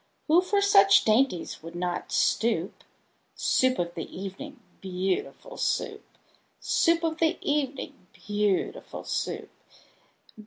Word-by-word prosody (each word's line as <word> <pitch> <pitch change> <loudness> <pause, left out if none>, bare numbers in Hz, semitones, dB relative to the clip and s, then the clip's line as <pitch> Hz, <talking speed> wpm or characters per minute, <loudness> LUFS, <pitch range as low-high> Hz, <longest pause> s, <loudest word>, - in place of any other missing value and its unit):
Who 330 +3 +5
for 400 +2 +1
such 195 - +6
dainties 220 -5 +1
would 165 +2 -10
not 175 0 -3
stoop? 205 -5 0 0.5
Soup 260 0 +2
of 170 -1 -2
the 165 - -6
evening, 195 +10 -8 0.2
beautiful 190 - -3
Soup! - - -1 0.6
Soup 335 -1 +2
of 320 -1 -1
the 325 0 +2
evening, 275 -9 -2
beautiful 205 -2 -2
Soup! - - -3
215 Hz, 110 wpm, -27 LUFS, 185-310 Hz, 0.6 s, such